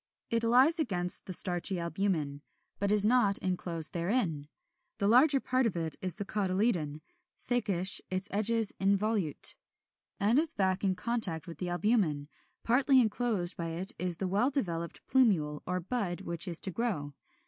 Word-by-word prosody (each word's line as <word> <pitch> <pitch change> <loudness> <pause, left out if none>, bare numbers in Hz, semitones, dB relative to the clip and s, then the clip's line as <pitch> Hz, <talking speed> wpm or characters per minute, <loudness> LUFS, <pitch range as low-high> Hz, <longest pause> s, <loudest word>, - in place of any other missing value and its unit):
It 230 0 0
lies 260 +9 +3
against 180 - -1
the - - -5
starchy 180 +1 +4
albumen, 170 -5 -3 0.4
but 200 0 -1
is 210 -1 +4
not 220 -4 +5
enclosed 175 -3 +2
therein. 170 - -2 0.5
The 200 - -1
larger 270 +5 +4
part 255 -1 0
of 185 - -4
it 160 -2 -3
is 185 -2 0
the 205 - -6
cotyledon, 185 -7 -1 0.4
thickish, 200 -7 +1
its 185 +1 -1
edges 220 +1 +2
involute, 200 -4 +2 0.7
and 220 +7 +2
its 320 0 -3
back 190 -1 -1
in 190 -2 0
contact 215 -8 0
with 170 -2 -11
the 180 - -3
albumen; 175 -6 -1 0.3
partly 265 +3 +3
enclosed 220 -6 -1
by 170 - -5
it 170 +4 -1
is 180 -2 -3
the 190 - -3
well 205 +8 +1
developed 170 - -4
plumule 175 - +1
or 180 +1 -2
bud 190 -2 -4
which 170 0 -2
is 170 -2 -1
to 190 - -3
grow. 175 -10 -3
195 Hz, 160 wpm, -29 LUFS, 170-230 Hz, 0.7 s, not